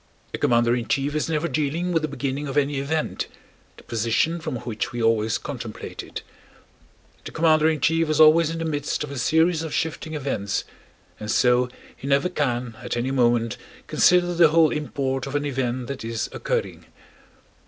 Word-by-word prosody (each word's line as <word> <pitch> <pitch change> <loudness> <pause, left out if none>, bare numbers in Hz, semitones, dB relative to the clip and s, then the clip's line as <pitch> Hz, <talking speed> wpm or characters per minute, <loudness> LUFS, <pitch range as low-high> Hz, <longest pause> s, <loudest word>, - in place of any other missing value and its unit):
A - - -3
commander 120 0 +3
in 120 -2 -3
chief 140 +2 0
is 155 +1 -1
never 160 +1 0
dealing 155 +3 -1
with 165 -2 +2
the 155 - -1
beginning 140 0 -3
of 135 +1 -3
any 145 -1 +1
event—the 155 +3 -5
position 115 +9 0
from 145 - -4
which 115 -2 -4
we 120 - -5
always 115 -1 +2
contemplate 120 -6 -7
it. - - -8 1.0
The - - -8
commander 160 -1 +4
in 155 -3 -1
chief 165 +2 +2
is 155 - +1
always 155 +1 +7
in 165 - -4
the 165 - -3
midst 145 -2 -2
of 150 - -6
a 140 - -5
series 160 +5 +2
of 160 -2 -4
shifting 160 0 -2
events 130 -9 -2 0.6
and 105 - -6
so 125 +1 +3 0.3
he 140 - -8
never 140 +5 +2
can 125 -8 -2
at - - -3
any 125 +3 -1
moment 120 -3 +2 0.3
consider 175 0 +3
the 170 -1 +6
whole 160 0 +4
import 135 -2 -2
of 135 - -5
an 145 0 0
event 130 -2 -2
that 135 0 -6
is 115 -1 -3
occurring. - - -3
140 Hz, 180 wpm, -24 LUFS, 120-155 Hz, 1.0 s, always